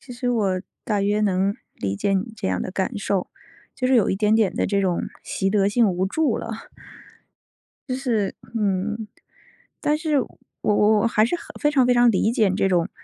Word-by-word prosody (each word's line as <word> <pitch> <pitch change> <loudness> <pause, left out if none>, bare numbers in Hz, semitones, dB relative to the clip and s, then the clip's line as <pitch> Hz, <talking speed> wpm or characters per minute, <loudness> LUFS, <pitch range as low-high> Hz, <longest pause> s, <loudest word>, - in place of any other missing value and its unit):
其 250 - -11
实 245 +1 -3
我 195 -6 +1 0.2
大 210 -2 0
约 205 +1 +1
能 195 0 +1 0.2
理 95 0 -3
解 195 - -1
你 195 +4 -1
这 - - -3
样 95 - -1
的 185 - -4
感 200 +3 -2
受， 195 -2 -1 0.5
就 255 - -1
是 260 - +3
有 230 -5 +4
一 190 - 0
点 210 +1 +2
点 220 -4 +3
地 - - 0
这 200 0 +1
种 180 -3 0 0.2
习 195 - -2
得 200 -1 +2
性 225 +1 +3
无 185 0 0
助 285 +3 0
了。 230 - -5 1.4
就 255 - -1
是 235 -7 -1 0.2
嗯， 210 +2 -1 0.7
但 300 - +2
是 305 -2 +1
我 255 - -3 0.3
我 210 +1 +3
还 215 -2 +3
是 240 - +1
很 - - -9 0.2
非 295 - +3
常 270 -4 +3
非 250 - +4
常 240 0 +5
理 220 +1 +2
解 220 -6 +2
这 195 - +2
种， 175 -1 +1
210 Hz, 215 characters per minute, -23 LUFS, 195-240 Hz, 1.4 s, 常